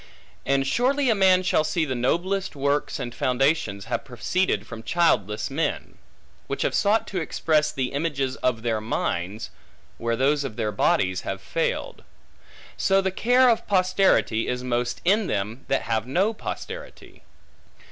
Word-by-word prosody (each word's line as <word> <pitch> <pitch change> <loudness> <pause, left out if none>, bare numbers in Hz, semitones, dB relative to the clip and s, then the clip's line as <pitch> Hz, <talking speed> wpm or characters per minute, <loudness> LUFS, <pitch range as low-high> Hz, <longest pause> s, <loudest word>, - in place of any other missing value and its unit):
And 135 0 +2
surely 255 - +2
a - - +5
man 190 -2 +4
shall 170 -3 +2
see 160 +1 0
the 130 - -2
noblest 180 +11 -1
works 140 +3 0
and 120 -3 -5
foundations 125 -6 0
have 115 0 -2
proceeded 150 +8 -1
from 115 -2 -8
childless 110 - +1
men; 150 +1 -3 0.5
which - - -2
have - - 0
sought 210 +2 +2
to 185 -3 -2
express 155 -1 +1
the 135 -4 -2
images 140 -3 -1
of 115 -3 -1
their 115 -2 0
minds, 105 -1 -3 0.5
where 115 0 0
those 140 +4 +2
of 135 -6 -5
their 110 -2 -1
bodies 95 -2 +1
have 95 0 -4
failed. 165 +11 -3 0.7
So 195 0 +3
the 190 -1 0
care 245 +6 +4
of 230 -2 +2
posterity 185 - +2
is 125 0 -2
most 120 -1 -2
in 205 +2 +3
them, 105 +5 -3
that 135 - 0
have 115 -1 -1
no 190 - +1
posterity. - - -8
140 Hz, 155 wpm, -24 LUFS, 120-185 Hz, 0.7 s, a